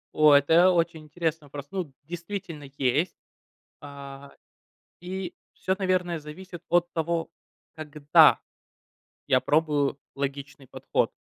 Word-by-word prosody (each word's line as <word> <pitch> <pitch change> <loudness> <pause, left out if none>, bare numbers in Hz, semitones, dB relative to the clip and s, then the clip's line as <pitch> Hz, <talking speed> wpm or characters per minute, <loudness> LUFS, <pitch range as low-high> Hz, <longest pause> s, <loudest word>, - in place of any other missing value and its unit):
О, 155 -1 +6
это 165 +6 +5
очень 165 -3 0
интересный 160 -1 -3
вопрос. 140 0 -8
Ну, 185 -7 -4
действительно, 170 -2 -7
есть. 145 +7 +1 0.7
А, 140 -1 -10 0.7
и 185 +1 -5 0.2
всё, 190 - -1
наверное, 180 -4 0
зависит 175 +3 -10
от 175 0 +2
того, 165 0 -2 0.4
когда 150 -2 +4 0.9
я - - +4
пробую 145 -3 +1 0.2
логичный 140 0 -5
подход. - - -1
160 Hz, 105 wpm, -26 LUFS, 145-175 Hz, 0.9 s, О